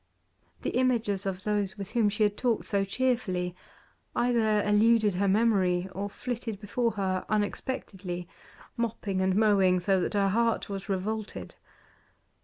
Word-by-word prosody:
The - - -1
images 225 -6 +1
of 190 0 -4
those 205 -2 -1
with 195 -2 -7
whom 230 -4 +3
she 210 +1 0
had 205 -1 +2
talked 235 -2 0
so 200 -1 +1
cheerfully 195 -5 -1 0.6
either 225 -4 +2
eluded 210 0 +4
her 195 +3 +1
memory, 190 -4 +2
or 200 +2 -4
flitted 230 -2 -5
before 225 +3 -1
her 190 -2 -1
unexpectedly, 200 -4 -3 0.5
mopping 215 -5 -2
and 190 0 +2
mowing, 195 -4 +4
so 190 +1 +2
that 205 - -2
her 200 -1 +3
heart 230 +2 +1
was 195 +1 -6
revolted. 210 +3 -3
205 Hz, 140 wpm, -28 LUFS, 190-225 Hz, 0.6 s, eluded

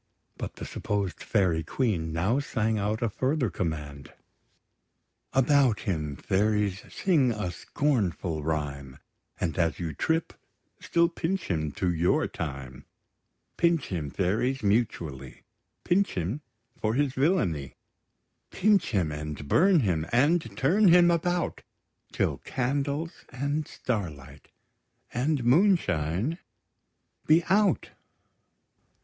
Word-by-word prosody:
But - - -6
the - - -7
supposed 100 -3 -3
Fairy 90 -7 +1
Queen 85 - -1
now 95 - +1
sang 110 -5 -1
out 105 +3 -1
a - - +2
further 130 - 0
command: 75 -6 -4 1.2
About 135 -3 +3
him, 75 -7 -2
fairies; 105 +2 0
sing 150 -10 +2
a 105 -5 -3
scornful 95 - -1
rhyme; 70 -4 -3 0.4
And, 85 -1 -2
as 85 -1 +1
you 85 -3 -4
trip, 160 - -1 0.5
still 170 0 +2
pinch 175 - -2
him 75 -3 -1
to 90 -2 0
your 85 +2 +2
time! 70 -4 -6 0.7
Pinch 170 -2 +2
him, 80 -6 -3
fairies, 110 - 0
mutually, 85 - -1 0.4
Pinch 195 +3 +2
him 95 - -2 0.4
for 110 +1 0
his 140 -1 +1
villainy; 130 - 0 0.7
Pinch 210 0 +2
him, 90 -9 0
and 75 -1 -6
burn 180 - +4
him, 85 -7 0
and 130 -4 +2
turn 190 +10 +4
him 175 0 +7
about, 175 +1 0 0.5
Till - - 0
candles, 140 +5 -2
and 140 +4 -2
starlight, 75 - -5 0.7
and 135 +2 0
moonshine 120 - +2 0.9
be 160 +2 +5
out! 205 +1 +2
110 Hz, 110 wpm, -27 LUFS, -, 1.2 s, him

